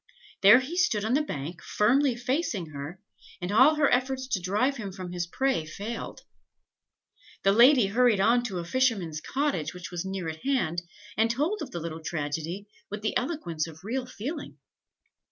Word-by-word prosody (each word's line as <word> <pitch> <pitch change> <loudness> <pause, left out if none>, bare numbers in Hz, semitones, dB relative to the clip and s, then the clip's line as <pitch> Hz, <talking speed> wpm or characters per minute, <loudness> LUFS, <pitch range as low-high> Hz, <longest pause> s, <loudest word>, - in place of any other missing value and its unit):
There 210 +6 +8
he 310 +7 -5
stood 220 - +2
on 225 - 0
the 285 - +4
bank, 165 - -5
firmly 255 +5 +2
facing 245 - -2
her, 145 +5 -7 0.4
and 180 +2 -4
all 260 +9 +6
her 300 -2 +3
efforts 260 +1 0
to 200 -7 0
drive 210 +10 +1
him 205 -5 -5
from 185 -2 -7
his 175 -1 -3
prey 265 0 0
failed. 205 +9 -6 1.2
The 195 - +5
lady 240 +3 +6
hurried 225 +1 +3
on 235 +5 +4
to 195 -6 -3
a 170 - -4
fisherman's 195 -9 0
cottage, 260 - -1
which 180 0 -8
was 175 -1 -3
near 190 -3 -4
at 160 0 -6
hand, 175 - 0 0.4
and 225 +1 +3
told 300 - 0
of 295 - -5
the 175 - -5
little 165 0 -6
tragedy 160 +5 -4 0.2
with 210 +1 -6
the 215 - -1
eloquence 245 - -2
of 160 +1 -12
real 250 +5 -3
feeling. 285 +8 -6
210 Hz, 175 wpm, -27 LUFS, 175-260 Hz, 1.2 s, There